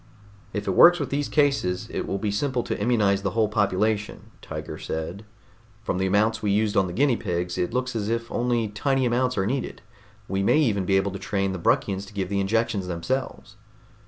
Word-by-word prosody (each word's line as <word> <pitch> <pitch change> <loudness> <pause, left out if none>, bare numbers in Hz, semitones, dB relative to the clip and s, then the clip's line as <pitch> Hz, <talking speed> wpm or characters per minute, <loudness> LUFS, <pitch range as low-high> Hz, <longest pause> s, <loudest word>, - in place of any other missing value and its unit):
"If 105 +1 -4
it - - +2
works 175 - +7
with 145 - -3
these 145 0 -1
cases, 115 -10 +1
it - - -3
will 100 - -1
be 105 +1 -2
simple 125 +3 -1
to - - -3
immunize 105 -4 +2
the 100 - -1
whole 110 -1 +4
population," 105 0 -1
Tiger - - -7
said. 85 +6 -5 0.6
"From 95 -4 -2
the 95 - +1
amounts 110 +3 +2
we 105 - -1
used 105 +1 +1
on 95 -2 +3
the 90 - -6
guinea 135 +3 +3
pigs, 90 -2 -3
it 90 - -1
looks 125 0 -2
as 105 -1 -2
if 115 0 -2
only 120 -2 0
tiny 135 +5 0
amounts 125 +1 +1
are 95 - +1
needed. 130 +4 -3 0.4
We 95 0 -1
may 100 - +3
even 105 -11 +2
be 95 +1 +3
able 100 +1 0
to 100 - -6
train 95 0 -1
the 95 - -5
Bruckians 95 +3 0
to 105 - -14
give 95 -2 -3
the 100 0 0
injections 100 -1 0
themselves." 110 +10 -4
105 Hz, 210 wpm, -25 LUFS, 95-120 Hz, 0.6 s, works